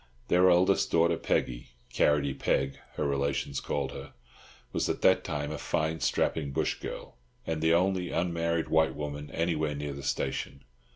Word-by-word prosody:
Their 90 +1 +5
eldest 90 +2 +4
daughter, 85 0 +3
Peggy—"Carrotty 60 +3 0
Peg," 70 0 0 0.2
her - - -1
relations 70 0 -1
called 70 -2 -2
her—was - - -7
at - - -2
that - - +5
time 75 0 -3
a 75 - -5
fine, 80 +1 -1
strapping, 75 -3 0
bush - - -1
girl, - - -8 0.3
and 80 -1 -2
the 80 +1 +4
only 90 0 +1
unmarried 85 -1 0
white 80 0 +3
woman 75 0 -5
anywhere 80 -3 -1
near 70 0 -4
the 70 - -7
station. 70 0 -3
75 Hz, 150 wpm, -29 LUFS, 70-85 Hz, 0.3 s, Their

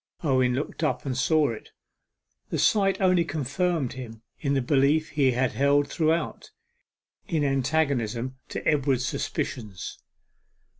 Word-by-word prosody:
Owen 130 -4 +2
looked 145 +4 -4
up 130 -4 0
and 130 -2 -2
saw 150 +3 +3
it. 115 - -7 0.8
The - - -2
sight 195 -2 +3
only 185 -2 +4
confirmed 155 -1 -1
him 115 -3 -9 0.2
in 140 -2 0
the 135 - +2
belief 145 +4 +2
he 140 -4 +2
had 125 0 +1
held 140 +1 +2
throughout, 160 0 -1 0.8
in 160 -3 0
antagonism 130 -3 0
to - - -4
Edward's 135 -4 +2
suspicions. 105 -8 -4
140 Hz, 130 wpm, -26 LUFS, 130-155 Hz, 0.8 s, only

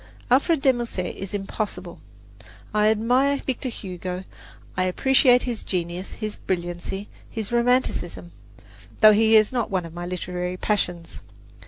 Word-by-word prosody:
Alfred 285 +3 +3
de 265 - +6
Musset 230 -7 -4
is 195 +1 -6
impossible! 195 -3 -4 0.7
I 210 0 +3
admire 250 +6 +3
Victor 265 -1 -3
Hugo 185 -3 -6 0.5
I 185 - +1
appreciate 250 +5 +4
his 240 -3 -3
genius, 175 0 -3
his 215 -1 -4
brilliancy, 175 +2 -4 0.2
his 220 -1 -5
romanticism; 240 -8 0 0.7
though 215 -1 +9
he 220 +1 +5
is 215 -1 +5
not 240 -4 -1
one 185 -3 -1
of 165 - -10
my 175 0 -5
literary 180 0 -3
passions. 180 -5 -2
205 Hz, 135 wpm, -24 LUFS, 180-240 Hz, 0.7 s, though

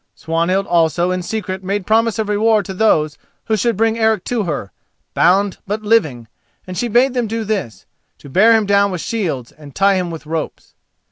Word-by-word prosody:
Swanhild 170 +4 -1
also 170 +1 +1
in 185 0 -2
secret 190 -1 -4
made 195 0 -2
promise 225 +1 +2
of 220 -2 -1
reward 210 +1 +2
to 190 - -6
those 155 -7 +1 0.3
who 220 - +1
should 230 0 0
bring 225 +1 +1
Eric 220 -4 +2
to 235 -4 -2
her, 140 - -4 0.4
bound, 195 +2 +2
but 210 +2 -3
living; 155 - +1 0.4
and 185 - -7
she 240 - -1
bade 245 +3 +3
them 245 -3 -1
do 225 +1 -3
this—to 195 - -7
bear 200 +11 +4
him 220 -1 +2
down 200 0 +3
with 180 -2 -4
shields 160 - -3
and 145 -2 -15
tie 195 0 +3
him 180 -1 -2
with 165 -2 -8
ropes. 160 0 -5
200 Hz, 190 wpm, -18 LUFS, 170-220 Hz, 0.4 s, bear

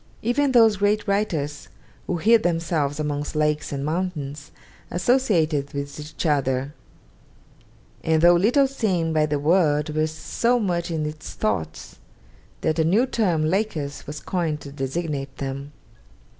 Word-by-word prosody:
Even 265 +5 +2
those 225 -4 +5
great 205 +2 +1
writers 160 -8 -1 0.4
who 180 - -1
hid 225 +6 +4
themselves 165 -5 0
amongst 150 -1 -3
lakes 150 0 0
and 140 0 -3
mountains 155 -4 -3 0.4
associated 175 - +1
with 140 +1 -5
each 150 +2 -6
other; 135 -2 0 1.3
and 160 0 +2
though 175 0 +8
little 230 +11 +4
seen 190 -12 0
by 155 -1 +2
the 150 -1 0
world 150 -1 +2
were 155 0 +2
so 230 +10 0
much 175 -5 -1
in 160 -2 -2
its 150 0 -6
thoughts 80 -7 -3 0.6
that 160 +1 0
a - - +4
new 200 +10 +3
term, 180 -11 +1
'Lakers,' 160 -6 -2
was 150 +1 -6
coined 165 -5 -2
to 140 - -9
designate 140 0 -4
them. 140 +1 -5
155 Hz, 140 wpm, -23 LUFS, 145-190 Hz, 1.3 s, though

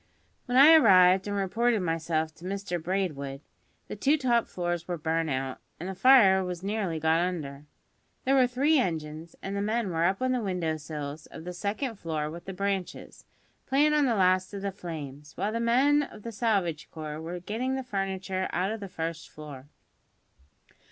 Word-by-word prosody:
When 250 +1 +1
I 295 +4 +9
arrived 190 - +6
and 205 0 -2
reported 220 +4 +1
myself 165 -2 -1
to 170 - -18
Mr 190 -2 -3
Braidwood, 160 -7 -2 0.5
the - - -6
two 290 +3 +2
top 240 -4 +1
floors 175 -1 -3
were 175 -1 -2
burnt 160 +1 -1
out, 130 -1 -3 0.2
and 175 - -5
the 190 - -4
fire 195 -5 +6
was 180 -1 -5
nearly 195 -5 -2
got 160 +1 +2
under. 150 -5 -3 0.6
There 265 - +3
were 260 -2 +5
three 280 +5 +2
engines, 160 -4 -3
and 195 +1 -4
the 200 - -1
men 215 -1 -1
were 165 0 +1
up 190 +2 +1
on 255 0 0
the 250 -1 0
window 180 -6 -1
sills 150 -1 -7
of - - -10
the 180 +1 -6
second 215 +6 -3
floor 155 -2 -3
with 170 +1 -9
the 195 - -5
branches, 190 -1 -4 0.4
playin' 290 +3 +3
on 295 -2 +3
the 235 - +2
last 185 0 +2
of 200 - -6
the 200 - -1
flames, 150 -6 -8
while 205 - -1
the 230 - -2
men 260 +6 +3
of 215 -7 -8
the 230 - -5
salvage 200 -8 -1
corps 155 -1 -6
were 175 +2 -5
getting 230 +8 -2
the 265 - -3
furniture 190 -4 -3
out 185 +3 0
of 220 - -4
the 200 -2 -7
first 165 -1 -5
floor. 145 -3 -10
185 Hz, 190 wpm, -28 LUFS, 160-220 Hz, 0.6 s, I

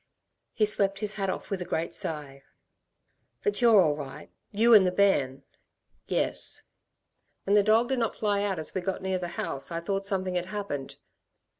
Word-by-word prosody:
He 215 - +3
swept 200 -2 +1
his 210 +1 -3
hat 195 -1 -2
off - - -5
with 195 -2 -2
a - - 0
great 170 -1 -3
sigh. 145 -3 -4 1.0
"But 415 -10 0
you're 230 -4 +7
all 155 -5 +4
right, 140 -3 -9 0.2
you 230 +3 +4
and 210 -3 +9
the 185 - +2
bairn?" 145 -9 +2 0.6
"Yes." - - -2 0.8
"When 200 - 0
the 210 - +6
dog 220 +4 +3
did 265 -2 0
not 230 -2 -1
fly 205 -2 0
out 200 -2 -1
as 155 -1 -4
we 185 - -2
got 190 +1 -3
near 190 -1 -1
the 175 - -4
house 135 - -2
I 165 - -2
thought 195 +3 -2
something 190 -2 0
had 180 0 -1
happened. 190 -9 -5
195 Hz, 185 wpm, -28 LUFS, 170-205 Hz, 1.0 s, and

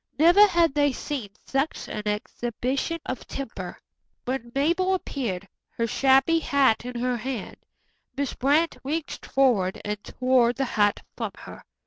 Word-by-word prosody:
Never 350 +7 +7
had 340 -6 +3
they 290 -2 +2
seen 260 -6 -4 0.2
such 275 +3 -1
an 210 0 -5
exhibition 240 +8 -2
of 255 - -5
temper. 200 -9 -6 0.5
When 250 -2 -3
Mabel 345 +7 +2
appeared, 215 - -4 0.3
her 230 - +1
shabby 270 +7 +4
hat 275 -8 +2
in 250 -1 -5
her 250 0 0
hand, 245 -2 -5 0.6
Miss 280 -2 -1
Brant 300 +5 +2
reached 300 +3 -4
forward 230 -9 +2
and 210 0 -3
tore 255 -2 +2
the 270 +2 -1
hat 205 -4 +1
from - - -4
her. - - -11
265 Hz, 140 wpm, -25 LUFS, 235-290 Hz, 0.6 s, Never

